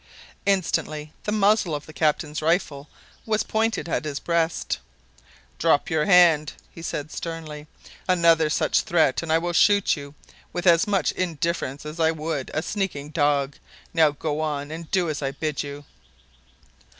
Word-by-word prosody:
Instantly 155 Hz, -5 st, 0 dB
the 210 Hz, -, -1 dB
muzzle 210 Hz, -5 st, +2 dB
of 145 Hz, -, -6 dB
the 155 Hz, -, -12 dB
captain's 150 Hz, +1 st, 0 dB
rifle 155 Hz, -3 st, 0 dB, 0.3 s
was 215 Hz, -1 st, 0 dB
pointed 220 Hz, -3 st, -1 dB
at -, -, -1 dB
his 145 Hz, -2 st, -4 dB
breast. 170 Hz, -1 st, -1 dB, 0.8 s
"Drop 160 Hz, 0 st, +2 dB
your 155 Hz, -1 st, +2 dB
hand!" 170 Hz, -5 st, +5 dB, 0.2 s
he 165 Hz, -, -11 dB
said 155 Hz, -2 st, -4 dB
sternly. 155 Hz, -3 st, -6 dB, 0.4 s
"Another 165 Hz, -3 st, +4 dB
such -, -, +2 dB
threat, 160 Hz, -6 st, +2 dB
and 165 Hz, -2 st, -4 dB
I 160 Hz, -, +5 dB
will 175 Hz, +1 st, -2 dB
shoot 200 Hz, +3 st, +4 dB
you 140 Hz, -1 st, -10 dB, 0.4 s
with 175 Hz, -, -3 dB
as 170 Hz, 0 st, +5 dB
much 200 Hz, -2 st, +1 dB
indifference 165 Hz, -4 st, -2 dB
as 155 Hz, +2 st, -7 dB
I 160 Hz, -1 st, +4 dB
would 155 Hz, -3 st, -3 dB
a 155 Hz, -, -2 dB
sneaking 180 Hz, -9 st, -3 dB
dog. 145 Hz, -3 st, +1 dB, 0.4 s
Now 160 Hz, -3 st, +5 dB
go 150 Hz, +1 st, -3 dB
on 150 Hz, -2 st, -3 dB
and 160 Hz, 0 st, -7 dB
do 185 Hz, -3 st, +1 dB
as 150 Hz, -2 st, -3 dB
I 135 Hz, -1 st, -2 dB
bid 155 Hz, -1 st, -2 dB
you." 145 Hz, 0 st, -8 dB
160 Hz, 160 wpm, -24 LUFS, 150-175 Hz, 0.8 s, hand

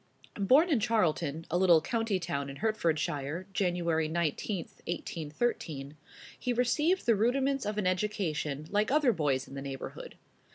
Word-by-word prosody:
Born 270 Hz, -, +5 dB
in 275 Hz, -, +4 dB
Charlton, 170 Hz, -8 st, 0 dB
a 175 Hz, -, +2 dB
little 175 Hz, -3 st, +6 dB
county 225 Hz, +3 st, -1 dB
town 140 Hz, -5 st, -3 dB
in 135 Hz, -, -7 dB
Hertfordshire, 160 Hz, -4 st, -1 dB
Jan. 180 Hz, -2 st, +1 dB, 0.4 s
19, 170 Hz, +4 st, -1 dB, 0.3 s
1813, 155 Hz, -, -3 dB, 0.4 s
he 250 Hz, -, -1 dB
received 300 Hz, +10 st, +2 dB
the 230 Hz, -, +4 dB
rudiments 265 Hz, +3 st, +1 dB
of 210 Hz, 0 st, -2 dB
an 210 Hz, -, 0 dB
education 175 Hz, -7 st, -1 dB
like 210 Hz, +1 st, +2 dB
other 280 Hz, -3 st, +4 dB
boys 140 Hz, -6 st, 0 dB
in -, -, -12 dB
the 135 Hz, -, -5 dB
neighborhood. 135 Hz, -1 st, -7 dB
185 Hz, 140 wpm, -30 LUFS, 155-230 Hz, 0.4 s, little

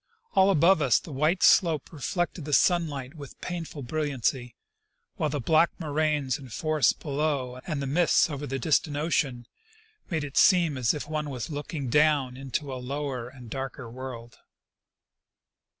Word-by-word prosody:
All 190 Hz, +1 st, +5 dB
about 175 Hz, 0 st, +4 dB
us 130 Hz, -5 st, +4 dB
the 160 Hz, -, -11 dB
white 155 Hz, +7 st, +1 dB
slope 165 Hz, -5 st, +4 dB
reflected 175 Hz, +2 st, -2 dB
the 150 Hz, -, -4 dB
sunlight 150 Hz, -6 st, +2 dB
with 145 Hz, -4 st, -11 dB
painful 165 Hz, -5 st, -6 dB
brilliancy, 130 Hz, -3 st, -2 dB, 0.6 s
while 155 Hz, -, 0 dB
the 145 Hz, 0 st, -2 dB
black 160 Hz, +6 st, +4 dB
moraines 150 Hz, -3 st, 0 dB
and 130 Hz, -4 st, -12 dB
forests 155 Hz, +3 st, +2 dB
below 140 Hz, -4 st, -2 dB
and 150 Hz, -5 st, -2 dB
the -, -, -2 dB
mists 165 Hz, +6 st, +3 dB
over 145 Hz, -2 st, -5 dB
the 135 Hz, -, -2 dB
distant 145 Hz, +2 st, +1 dB
ocean, 140 Hz, -6 st, -1 dB, 0.6 s
made 160 Hz, -5 st, -1 dB
it 140 Hz, -2 st, -6 dB
seem 175 Hz, -6 st, +5 dB
as 125 Hz, -1 st, +1 dB
if 150 Hz, -, -5 dB
one 155 Hz, -1 st, -3 dB
was 130 Hz, +2 st, -5 dB
looking 145 Hz, -1 st, -4 dB
down 150 Hz, -3 st, +3 dB
into 135 Hz, +1 st, -4 dB
a 130 Hz, -, -6 dB
lower 130 Hz, -2 st, -4 dB
and 125 Hz, -3 st, -13 dB
darker 135 Hz, -2 st, -5 dB
world. 120 Hz, -2 st, -8 dB
145 Hz, 155 wpm, -27 LUFS, 130-155 Hz, 0.6 s, All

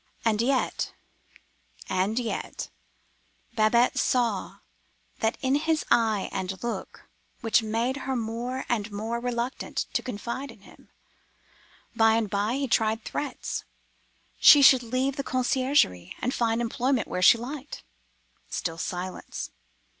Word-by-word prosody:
And 220 Hz, -1 st, +2 dB
yet—and 225 Hz, -5 st, -3 dB
yet—Babette 235 Hz, 0 st, -2 dB
saw 230 Hz, -6 st, 0 dB, 0.6 s
that 225 Hz, +1 st, 0 dB
in 265 Hz, -1 st, +1 dB
his 315 Hz, +2 st, +1 dB
eye 220 Hz, -4 st, +3 dB
and 190 Hz, +1 st, -4 dB
look 235 Hz, -, -5 dB, 0.3 s
which 225 Hz, +1 st, +3 dB
made 230 Hz, +4 st, -1 dB
her 265 Hz, -1 st, -3 dB
more 240 Hz, +3 st, -3 dB
and 215 Hz, -3 st, -1 dB
more 220 Hz, +3 st, -3 dB
reluctant 245 Hz, +1 st, -3 dB
to -, -, +1 dB
confide 250 Hz, +4 st, -5 dB
in 230 Hz, -4 st, -14 dB
him. -, -, -18 dB, 1.1 s
By 225 Hz, 0 st, +5 dB
and 225 Hz, -3 st, 0 dB
by 205 Hz, +4 st, 0 dB
he 275 Hz, 0 st, -1 dB
tried 225 Hz, -1 st, +1 dB
threats. 285 Hz, -3 st, -4 dB, 0.8 s
She 290 Hz, -2 st, +9 dB
should 260 Hz, -2 st, +8 dB
leave 255 Hz, +4 st, -1 dB
the 275 Hz, -, -2 dB
conciergerie, 255 Hz, -, +1 dB
and 250 Hz, -, -1 dB
find 230 Hz, 0 st, +1 dB
employment 245 Hz, +1 st, 0 dB
where 180 Hz, -, -3 dB
she 205 Hz, -, +7 dB
liked. 270 Hz, +4 st, -7 dB, 0.7 s
Still 165 Hz, 0 st, -3 dB
silence. 180 Hz, +2 st, -5 dB
235 Hz, 120 wpm, -27 LUFS, 215-255 Hz, 1.1 s, She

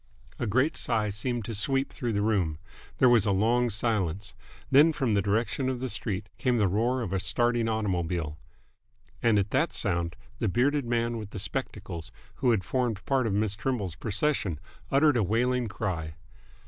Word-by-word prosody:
A 120 Hz, -, -1 dB
great 130 Hz, +9 st, +2 dB
sigh 105 Hz, -1 st, 0 dB
seemed 115 Hz, +2 st, -2 dB
to 115 Hz, -, -4 dB
sweep 135 Hz, +6 st, 0 dB
through 120 Hz, -4 st, -2 dB
the 100 Hz, 0 st, 0 dB
room. 95 Hz, -8 st, +1 dB, 0.4 s
There 130 Hz, -, +5 dB
was 120 Hz, -4 st, +5 dB
a -, -, +3 dB
long 120 Hz, +5 st, +2 dB
silence. 100 Hz, -5 st, -1 dB, 0.4 s
Then, 150 Hz, +4 st, +6 dB
from 135 Hz, -6 st, 0 dB
the 100 Hz, -1 st, +3 dB
direction 115 Hz, +6 st, 0 dB
of 130 Hz, -2 st, -2 dB
the 130 Hz, +1 st, -3 dB
street, 100 Hz, -1 st, -3 dB
came 125 Hz, -3 st, +2 dB
the 105 Hz, -3 st, +3 dB
roar 120 Hz, +6 st, +1 dB
of 95 Hz, -4 st, -4 dB
a 95 Hz, -, +1 dB
starting 120 Hz, +3 st, +1 dB
automobile. 85 Hz, -7 st, -1 dB, 0.8 s
And 115 Hz, -3 st, +4 dB
at 100 Hz, +1 st, 0 dB
that 150 Hz, +6 st, +2 dB
sound 85 Hz, -4 st, -1 dB, 0.2 s
the 110 Hz, -, +1 dB
bearded 135 Hz, +6 st, +2 dB
man 115 Hz, 0 st, 0 dB
with 105 Hz, -2 st, -7 dB
the 110 Hz, -, -8 dB
spectacles 85 Hz, -3 st, -4 dB, 0.3 s
who 125 Hz, -, +2 dB
had 110 Hz, -5 st, +2 dB
formed 120 Hz, -2 st, -1 dB
part 130 Hz, -3 st, +2 dB
of 105 Hz, -, -1 dB
Miss 105 Hz, 0 st, +1 dB
Trimble's 105 Hz, -5 st, -2 dB
procession 100 Hz, -, 0 dB, 0.3 s
uttered 145 Hz, -1 st, +4 dB
a -, -, +3 dB
wailing 120 Hz, +5 st, +1 dB
cry. 85 Hz, -7 st, -3 dB
110 Hz, 180 wpm, -28 LUFS, 100-125 Hz, 0.8 s, Then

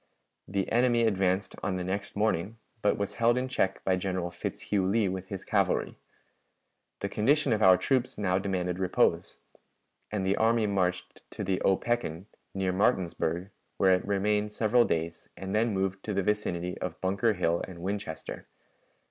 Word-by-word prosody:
The 95 Hz, 0 st, -2 dB
enemy 120 Hz, 0 st, +3 dB
advanced 95 Hz, -2 st, +1 dB
on 95 Hz, -, -1 dB
the 90 Hz, -, -2 dB
next 100 Hz, +3 st, -4 dB
morning, 105 Hz, 0 st, 0 dB, 0.2 s
but 105 Hz, -, +2 dB
was 100 Hz, -1 st, -2 dB
held 120 Hz, +1 st, +4 dB
in 130 Hz, +1 st, -1 dB
check 95 Hz, -7 st, -1 dB
by 95 Hz, -1 st, +2 dB
General 90 Hz, -2 st, -2 dB
Fitzhugh 95 Hz, +3 st, -2 dB
Lee 105 Hz, +1 st, +2 dB
with 95 Hz, 0 st, -4 dB
his 95 Hz, -1 st, -6 dB
cavalry. -, -, +1 dB, 1.1 s
The 100 Hz, -, -1 dB
condition 140 Hz, +5 st, +2 dB
of 110 Hz, -, 0 dB
our 95 Hz, -2 st, +7 dB
troops 125 Hz, +6 st, 0 dB
now 95 Hz, -2 st, +1 dB
demanded 90 Hz, -2 st, -2 dB
repose, 95 Hz, -1 st, +1 dB, 0.7 s
and 100 Hz, -3 st, -1 dB
the 95 Hz, +1 st, +1 dB
army 115 Hz, 0 st, +3 dB
marched 90 Hz, -3 st, -1 dB
to -, -, -5 dB
the 95 Hz, -1 st, -1 dB
Opequan, 95 Hz, -4 st, 0 dB, 0.3 s
near 95 Hz, -1 st, 0 dB
Martinsburg, 90 Hz, -3 st, 0 dB, 0.3 s
where 95 Hz, -1 st, +5 dB
it 90 Hz, -, +1 dB
remained 105 Hz, +1 st, +1 dB
several 115 Hz, +3 st, +3 dB
days, 80 Hz, 0 st, -3 dB
and 95 Hz, 0 st, -5 dB
then 110 Hz, +2 st, +2 dB
moved 95 Hz, -1 st, -1 dB
to 105 Hz, -, -2 dB
the 100 Hz, -, +1 dB
vicinity 90 Hz, -4 st, -1 dB
of 90 Hz, -3 st, -5 dB
Bunker 100 Hz, +4 st, +1 dB
Hill 85 Hz, -3 st, 0 dB
and 90 Hz, -, -10 dB
Winchester. 100 Hz, -4 st, -5 dB
95 Hz, 165 wpm, -29 LUFS, 90-105 Hz, 1.1 s, our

